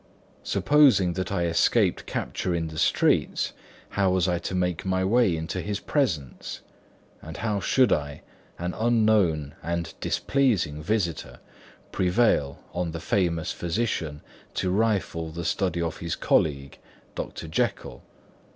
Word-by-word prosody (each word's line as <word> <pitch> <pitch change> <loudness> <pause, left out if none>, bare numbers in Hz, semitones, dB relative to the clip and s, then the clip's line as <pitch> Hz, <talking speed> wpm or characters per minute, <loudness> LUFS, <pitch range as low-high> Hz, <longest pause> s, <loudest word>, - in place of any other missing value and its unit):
Supposing 135 -12 +4
that 95 0 -3
I 95 -3 0
escaped 85 -1 +2
capture 90 - -2
in 80 -1 -2
the 80 -1 -6
streets, - - +2 0.4
how 100 -1 +1
was 90 -1 +2
I 90 -1 +1
to 95 - -4
make 90 -2 -1
my 95 0 0
way 105 -4 +3
into 80 +3 -3
his 105 +1 -3
presence? 80 - -2 0.6
and 80 +1 -8
how 105 -3 -1
should 125 +3 +3
I, 75 -1 -3 0.3
an 90 +1 -3
unknown 105 -10 +2
and 85 0 -3
displeasing 105 - +1
visitor, 85 -2 -2 0.5
prevail 90 -7 +1
on 85 -2 -2
the 85 - -4
famous 85 -2 0
physician 85 -5 -2 0.3
to 90 - 0
rifle 95 -6 0
the 85 +1 -6
study 85 -1 0
of 80 -2 -3
his 85 -2 -3
colleague, 70 -3 0 0.3
Dr. - - -6
Jekyll? 70 -5 -2
90 Hz, 135 wpm, -26 LUFS, 80-100 Hz, 0.6 s, Supposing